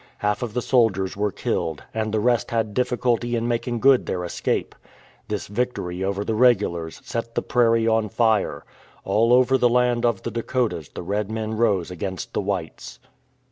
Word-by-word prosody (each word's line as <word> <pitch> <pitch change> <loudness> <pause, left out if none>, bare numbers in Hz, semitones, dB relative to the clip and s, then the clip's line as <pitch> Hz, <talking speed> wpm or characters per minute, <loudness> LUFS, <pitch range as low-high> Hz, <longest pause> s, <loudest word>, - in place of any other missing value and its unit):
Half 105 +2 -1
of 120 -3 -4
the 125 - 0
soldiers 105 -7 +2
were 105 0 0
killed, 80 -4 -2
and 110 -1 -2
the 110 - +1
rest 120 +1 +1
had 110 -2 -1
diffi 125 +1 0
culty 120 -1 0
in 115 +1 -1
making 120 0 -2
good 135 -1 +5
their 90 -1 -2
escape. 85 - -2 0.5
This 105 -1 -3
victory 100 -5 -3
over 100 +1 -2
the 110 - -1
regulars 105 -9 +2
set 115 0 -4
the - - 0
prairie 115 -2 +2
on 110 -1 +2
fire. 110 -2 +1 0.4
All 110 +4 +2
over 130 +1 +4
the 125 - +4
land 125 0 +2
of 120 -1 +1
the 115 - -3
Dakotas 115 - -2
the - - -8
red 100 +3 -2
men 110 0 -3
rose 100 -6 +1
against 95 0 -5
the - - 0
whites. - - -4
115 Hz, 180 wpm, -23 LUFS, 100-120 Hz, 0.5 s, good